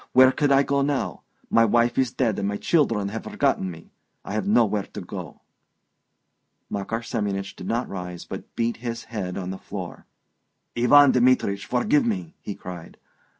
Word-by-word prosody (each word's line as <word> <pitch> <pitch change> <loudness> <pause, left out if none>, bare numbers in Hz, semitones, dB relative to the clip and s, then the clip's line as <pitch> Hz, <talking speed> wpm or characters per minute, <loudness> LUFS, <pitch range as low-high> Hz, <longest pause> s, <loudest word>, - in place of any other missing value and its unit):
Where 130 0 +8
could 145 +1 +1
I 135 0 +5
go 140 0 +1
to 140 - +1
now?... 145 -2 -2 0.3
My 115 - +5
wife 120 +2 +3
is 130 -2 +1
dead, 115 -6 0
and 100 - -1
my 100 0 -2
children 115 -12 +1
have 110 +2 -6
forgotten 95 - 0
me. 85 -2 -11 0.3
I - - -5
have 105 -2 -1
nowhere 105 -2 +2
to - - -4
go..." - - -8 1.3
Makar 110 +4 -3
Semyonich 100 -4 -3
did - - -8
not 120 +2 -1
rise, 90 -2 -6
but - - -9
beat 115 0 0
his 115 0 -5
head 95 -5 -5
on 95 -1 -4
the 95 - -6
floor. - - -8 0.7
"Ivan 135 +4 +7
Dmitrich, 125 -6 +2
forgive 215 - +2
me!" 185 -8 -2
he 100 - -5
cried. 90 -2 -9
115 Hz, 175 wpm, -24 LUFS, 100-130 Hz, 1.3 s, Where